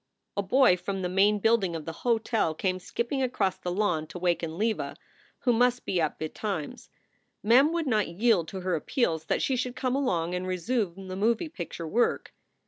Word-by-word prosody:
A 200 - +1
boy 200 -1 +4
from 195 +1 -4
the 180 - -1
main 200 +3 +4
building 205 -5 +2
of 160 -2 -6
the 165 - -4
hotel 225 -7 +1
came 185 +2 -1
skipping 235 +8 -2
across 215 -7 0
the 180 - -4
lawn 175 -5 0
to - - -8
waken 170 -2 -1
Leva, 220 +2 -1 0.5
who 245 - +3
must 245 +1 +2
be 180 - 0
up 155 - -1
betimes. 160 +1 -5 0.5
Mem 255 +8 +5
would 335 -1 -1
not 215 -6 +1
yield 185 -1 +2
to 190 +2 -6
her 185 0 -1
appeals 160 - 0
that - - 0
she 265 - +1
should 250 0 -2
come 255 0 -1
along 180 -11 0
and 180 +1 -2
resume 190 0 -2
the 185 - -5
moving 230 - 0
picture 170 - -6
work. 235 +9 0
195 Hz, 190 wpm, -28 LUFS, 175-235 Hz, 0.5 s, Mem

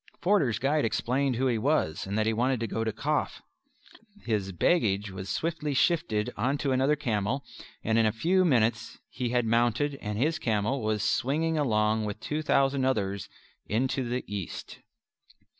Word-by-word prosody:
Forder's 175 - +2
guide 145 +3 +1
explained 130 +4 0
who 130 +3 0
he 120 -4 +1
was 110 - 0
and 100 +2 -2
that 110 - +2
he 110 - +1
wanted 125 +2 +1
to - - 0
go 115 0 -2
to 110 - -1
Kaf. 145 +8 -2 0.8
His 105 -4 -1
baggage 100 - +1
was 95 0 -7
swiftly 155 -3 -2
shifted 125 -9 +1
onto 135 +5 0
another 135 +3 +3
camel, 120 0 -1 0.4
and 110 +1 +2
in 110 - +4
a - - +2
few 175 - +2
minutes 115 -7 +1
he 125 -2 -3
had 120 -1 +1
mounted, 120 +5 +1
and 105 -1 -4
his 155 +8 +1
camel 115 +4 0
was 110 -1 -1
swinging 150 +9 +1
along 110 -6 +1
with 105 0 -4
two 150 +7 -3
thousand 135 -2 +2
others 100 -7 -1 0.4
into 130 +5 0
the 125 +1 -2
east. 100 -4 -6
120 Hz, 165 wpm, -28 LUFS, 110-140 Hz, 0.8 s, in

